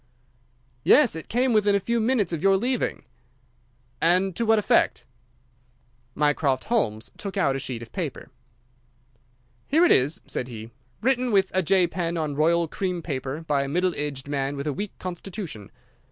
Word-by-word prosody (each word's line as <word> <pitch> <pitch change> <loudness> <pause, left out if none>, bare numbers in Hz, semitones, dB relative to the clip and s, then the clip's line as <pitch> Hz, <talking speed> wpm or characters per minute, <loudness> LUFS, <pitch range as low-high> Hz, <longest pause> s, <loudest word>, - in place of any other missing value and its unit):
"Yes, 270 - +5
it 160 - -7
came 250 +1 +2
within 205 -2 +3
a - - +3
few 235 +4 -1
minutes 225 -5 +1
of 160 - -2
your 195 0 +4
leaving." 245 +4 -1 1.0
"And 180 +2 +3
to 230 - -1
what 225 0 +5
effect?" 210 - +2 1.1
Mycroft 145 -3 +1
Holmes 115 - -1
took 200 -1 -5
out 140 -8 +2
a - - -2
sheet 125 -3 -5
of 115 - -13
paper. - - -5 1.4
"Here 320 +5 +4
it - - +4
is," 140 +5 +3
said 125 - -4
he, 115 -2 -9 0.3
"written 255 -1 +2
with 195 -2 +3
a 190 - +2
J 185 +1 +3
pen 170 0 -3
on 155 -3 -2
royal 165 +3 +2
cream 180 0 -3
paper 135 0 -4
by 145 -2 +2
a 140 - -2
middle 180 +4 +1
aged 145 -2 -4
man 140 0 -2
with 140 - -4
a 150 - -1
weak 205 +6 -5
constitution. 175 - -7
175 Hz, 170 wpm, -25 LUFS, 145-205 Hz, 1.4 s, Yes